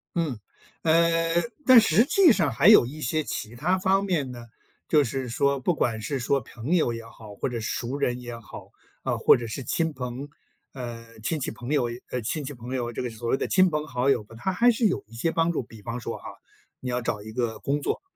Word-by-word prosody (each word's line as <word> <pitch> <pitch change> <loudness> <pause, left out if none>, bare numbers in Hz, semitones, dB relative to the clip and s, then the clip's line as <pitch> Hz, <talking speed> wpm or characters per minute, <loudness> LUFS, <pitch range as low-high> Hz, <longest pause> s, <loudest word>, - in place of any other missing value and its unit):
嗯， 155 -9 -1 0.5
呃， 165 +1 +3 0.2
但 255 -3 +9
实 215 +5 +4
际 345 -1 +6
上 165 -9 +2
还 115 - +3
有 - - +9
一 150 +6 -8
些 155 +4 0
其 115 -3 -5
它 180 +9 +1
方 195 +1 +2
面 155 -9 0
呢， 120 -1 -9 0.4
就 150 -2 +4
是 130 0 -3
说 140 +3 +1
不 170 +7 +1
管 115 -7 -1
是 135 +6 -2
说 140 +3 +1
朋 120 +8 -3
友 140 -9 +2
也 115 - -6
好， 110 -2 -12
或 100 - -3
者 120 - -3
是 - - -6
熟 125 +3 -3
人 125 -3 -1
也 120 -1 -7
好， 110 -3 -11 0.3
啊， - - -1
或 - - +6
者 120 - -5
是 130 +4 -5
亲 160 +7 0
朋 130 +1 -6 0.4
呃， 115 -3 -8
亲 150 +8 -1
戚 130 - -2
朋 120 +2 -8
友 135 -5 +2
也 120 +1 -6
呃， 125 - -2
亲 145 +7 -3
戚 145 - -5
朋 125 +1 -6
友， 120 -2 -2
这 - - -3
个 125 - -3
所 115 +1 -7
谓 135 - +2
的 - - -2
亲 185 -1 +4
朋 150 0 -2
好 125 0 -1
友 120 -5 +1
吧， 115 - -15
他 190 +10 -1
还 235 +6 +4
是 230 0 0
有 195 - +1
一 115 - -14
些 160 +8 0
帮 165 +1 +2
助， 160 - -2
比 110 -2 -14
方 115 +3 -5
说 - - -5
哈， - - -16 0.5
你 125 - -5
要 125 0 -1
找 105 -3 -3
一 110 - -8
个 115 -2 -2
工 145 +1 -1
作。 - - -2
130 Hz, 260 characters per minute, -26 LUFS, 120-160 Hz, 0.5 s, 但